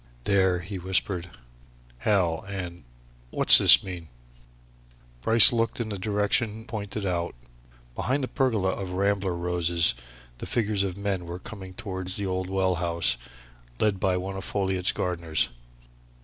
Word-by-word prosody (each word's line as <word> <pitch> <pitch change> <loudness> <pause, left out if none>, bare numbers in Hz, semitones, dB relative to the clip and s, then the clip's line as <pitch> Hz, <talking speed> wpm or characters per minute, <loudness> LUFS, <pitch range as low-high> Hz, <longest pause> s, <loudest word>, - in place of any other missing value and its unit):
"There!" 95 -1 +1
he 95 +2 -8
whispered. 90 -1 -3 0.7
"Hell 90 - -1
and 90 -5 -8 0.4
What's - - +10
this - - +6
mean?" 90 -3 -9 1.1
Bryce 115 - +9
looked 115 0 -2
in 115 -2 -4
the 100 -2 -6
direction 105 +2 -2
pointed 105 -2 -6
out. 85 -4 -3 0.6
Behind 135 - -3
the - - -3
pergola 115 -9 -1
of 95 -1 -5
rambler 100 -1 -1
roses 85 -1 -1 0.5
the - - -8
figures 105 -4 -1
of 95 -1 -4
men 100 -3 -4
were 85 +1 -7
coming 95 -2 -11
towards 95 -2 -6
the 100 - -3
old 95 0 -4
well 95 -1 0
house 85 -4 -1 0.6
led 105 -3 0
by 95 -1 0
one 95 +1 -6
of 95 - -7
Folliot's 95 -2 -1
gardeners. 85 -3 -2
95 Hz, 140 wpm, -25 LUFS, 90-100 Hz, 1.1 s, What's